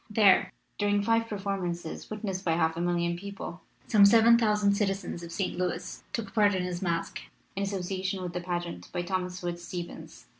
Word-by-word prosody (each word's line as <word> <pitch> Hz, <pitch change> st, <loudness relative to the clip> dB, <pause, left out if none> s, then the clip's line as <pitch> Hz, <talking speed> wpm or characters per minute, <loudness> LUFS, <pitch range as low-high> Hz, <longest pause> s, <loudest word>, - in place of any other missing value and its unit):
There, 210 Hz, -3 st, +5 dB, 0.3 s
during 205 Hz, 0 st, +2 dB
five 230 Hz, +1 st, +2 dB
performances, 195 Hz, -5 st, -4 dB
witnessed 200 Hz, -3 st, -4 dB
by 165 Hz, -, +2 dB
half 160 Hz, -1 st, +1 dB
a 170 Hz, -, -3 dB
million 170 Hz, 0 st, +1 dB
people, 195 Hz, -2 st, -7 dB, 0.2 s
some 210 Hz, -3 st, +5 dB
seven 225 Hz, +3 st, +7 dB
thousand 210 Hz, -3 st, +3 dB
citizens 195 Hz, -3 st, -1 dB
of 170 Hz, -1 st, -8 dB
St. 190 Hz, +2 st, -2 dB
Louis 180 Hz, 0 st, -3 dB
took 220 Hz, -4 st, -4 dB
part 205 Hz, -3 st, +4 dB
in 185 Hz, -, 0 dB
his 180 Hz, -1 st, -3 dB
masque, 170 Hz, -3 st, -1 dB, 0.4 s
in 195 Hz, -, -2 dB
asso 200 Hz, 0 st, -1 dB
ciation 190 Hz, +1 st, -3 dB
with 175 Hz, -1 st, -4 dB
the 180 Hz, -, -3 dB
pageant 175 Hz, -1 st, -4 dB
by 175 Hz, -1 st, -2 dB
Thomas 180 Hz, 0 st, -3 dB
Wood 175 Hz, 0 st, -3 dB
Stevens. 170 Hz, -2 st, -8 dB
185 Hz, 185 wpm, -29 LUFS, 175-205 Hz, 0.4 s, seven